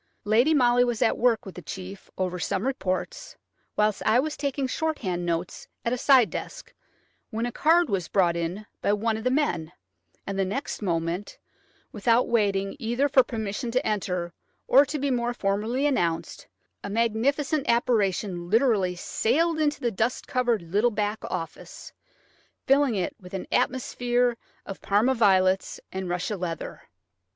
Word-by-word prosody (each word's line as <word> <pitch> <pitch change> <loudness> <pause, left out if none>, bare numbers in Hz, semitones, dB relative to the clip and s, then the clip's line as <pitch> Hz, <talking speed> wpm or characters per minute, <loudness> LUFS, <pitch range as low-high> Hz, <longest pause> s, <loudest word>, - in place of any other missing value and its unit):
Lady 230 +8 +3
Molly 245 -4 +4
was 240 -2 0
at - - +2
work 235 -2 +2
with 190 - -8
the 180 - -9
chief 190 +4 -8
over 180 -1 -2
some 185 +5 -1
reports, 265 - -3 0.4
whilst 210 -1 +1
I 220 +3 +4
was 300 +3 -1
taking 280 -1 -2
shorthand 245 - -2
notes 170 +1 -3 0.2
at 235 - +1
a - - 0
side 260 -5 +5
desk, - - -7 0.6
when 225 0 -2
a 245 - -3
card 335 +6 +3
was 190 -6 -1
brought 175 -4 +2
in 170 +5 -3 0.2
by 200 - +2
one 220 +2 0
of 220 - -5
the 255 - +2
men, 215 - 0 0.5
and 195 0 -4
the - - +3
next 210 +9 -4
moment, 170 0 -2 0.5
without 230 +3 +2
waiting 200 -4 +1
either 240 +4 +1
for 275 -2 +5
permission 225 0 -4
to 255 +4 0
enter 180 -4 -2 0.3
or 275 +2 +6
to 300 - -3
be 280 -1 -1
more 240 -1 -1
formally 215 +7 -1
announced, 175 - -1 0.4
a - - -5
magnificent 255 +7 0
apparition 200 -7 +1
literally 215 -5 +2
sailed 315 - 0
into 300 -1 +1
the 240 - -1
dust 225 +4 -1
covered 240 -6 0
little 205 +8 +2
back 210 0 -2
office, 165 -1 -7 0.7
filling 275 -3 +3
it 185 -3 -2
with 180 0 -9
an 190 - -4
atmosphere 245 -1 +1 0.3
of 195 - -8
Parma 215 +6 +2
violets 190 -5 +2
and 190 -1 -4
russia 180 +4 -2
leather 170 -2 -5
220 Hz, 160 wpm, -26 LUFS, 190-255 Hz, 0.7 s, or